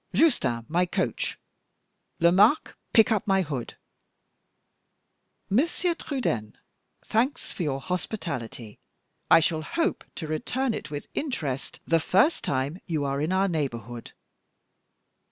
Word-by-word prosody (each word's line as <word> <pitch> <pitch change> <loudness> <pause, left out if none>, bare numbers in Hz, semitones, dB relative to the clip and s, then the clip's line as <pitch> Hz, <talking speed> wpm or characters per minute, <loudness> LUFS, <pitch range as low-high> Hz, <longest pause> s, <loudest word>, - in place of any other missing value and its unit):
Justin, 195 - +3
my 175 +3 +2
coach! - - -1 0.8
Lomaque, 195 - +5 0.2
pick 225 -1 +6
up 215 -2 +1
my 195 -1 +3
hood. 140 -7 -5 1.7
Monsieur 335 - +1
Trudaine, 120 - -3 0.5
thanks 240 +6 0
for - - -6
your 140 -5 0
hospitality; 140 - -4 0.5
I - - +9
shall 160 0 0
hope 330 - -1
to 165 - -5
return 230 - -1
it - - -5
with 145 -1 -5
interest 145 - -3
the 165 0 +3
first 195 - +3
time 140 +6 -1
you 155 -5 -1
are 140 0 -1
in 155 +4 0
our 190 +1 +3
neighborhood. 120 -8 -4
170 Hz, 120 wpm, -27 LUFS, 140-220 Hz, 1.7 s, I